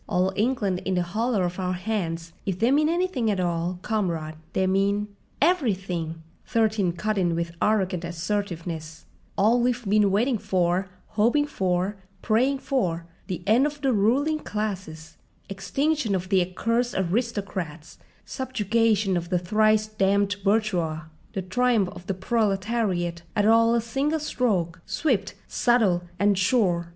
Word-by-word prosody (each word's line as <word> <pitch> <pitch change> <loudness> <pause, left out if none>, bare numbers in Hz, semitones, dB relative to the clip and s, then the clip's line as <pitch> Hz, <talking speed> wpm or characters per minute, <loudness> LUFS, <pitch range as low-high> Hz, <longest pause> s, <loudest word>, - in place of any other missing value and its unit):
"'All 185 +2 +1
England 205 -4 0
in 190 - -1
the 180 - +1
hollow 215 +3 0
of 175 +1 -3
our 185 -1 -1
hands!' 175 -4 -3
If 190 -3 -2
they 230 +6 +2
mean 300 +2 +3
anything 345 -9 0
at 200 -3 0
all, 175 0 -1
comrade, 170 -8 -1 0.2
they 190 - +1
mean—" 200 +2 +1 0.3
"Everything!" 185 - 0 0.2
Thirteen 215 -6 +1
cut 210 +4 -1
in 175 -2 +1
with 170 0 -2
arrogant 190 -5 +1
assertiveness; 170 -2 -4 0.3
"all 225 +5 +4
we've 245 -2 0
been 205 0 +4
waiting 225 +4 +1
for, 185 0 0 0.2
hoping 235 +8 +2
for, 190 -5 -1 0.3
praying 250 +5 +2
for—the 175 - -3
end 235 +7 +4
of 295 -1 -7
the 270 -3 +2
ruling 270 +10 +2
classes, 190 - -5 0.3
extinction 240 +4 0
of 185 0 -3
the 190 -2 +4
accursed 230 +7 -1
aristocrats, 190 -5 -3 0.3
subjugation 225 -5 +1
of 170 -1 -2
the 180 - +2
thrice 215 +4 +2
damned 200 -1 +1
bourgeois, 190 -7 +1 0.3
the 190 -3 -3
triumph 215 +1 +2
of 180 - -12
the 195 - -1
proletariat, 195 -4 0 0.2
all 230 +2 +5
at 235 - +1
a - - -13
single 285 +7 0
stroke, 195 - -1
swift, 195 +1 0
subtle, 220 -8 +2 0.2
and 200 0 +2
sure! 185 -5 +2
200 Hz, 140 wpm, -25 LUFS, 180-230 Hz, 0.3 s, all